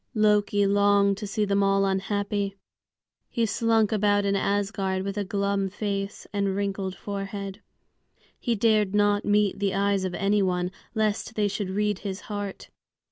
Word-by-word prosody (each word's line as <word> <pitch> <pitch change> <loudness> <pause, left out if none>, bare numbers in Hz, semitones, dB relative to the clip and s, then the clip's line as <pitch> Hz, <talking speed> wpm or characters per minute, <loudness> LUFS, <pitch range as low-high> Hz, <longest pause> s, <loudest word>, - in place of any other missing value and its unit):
Loki 210 -1 +3
longed 200 0 +3
to 210 0 -5
see 210 +2 0
them 200 0 +1
all 195 0 +3
unhappy. 200 +1 -1 0.7
He 235 - 0
slunk 225 0 +2
about 205 -1 +2
in 200 0 +1
Asgard 195 -1 0
with 200 0 -3
a 205 - -1
glum 200 0 -1
face 200 0 -4
and 200 -1 0
wrinkled 195 -1 -2
forehead. 200 +1 -5 0.8
He 235 -2 0
dared 215 -2 +2
not 205 0 +3
meet 205 -1 +2
the 200 -2 0
eyes 200 -1 +1
of 185 -2 -2
any 205 +1 +2
one, 180 -1 0 0.2
lest 220 0 -1
they 210 -1 +2
should 200 -1 -3
read 210 0 0
his 195 -2 -5
heart. 205 -2 -6
200 Hz, 155 wpm, -26 LUFS, 195-210 Hz, 0.8 s, Loki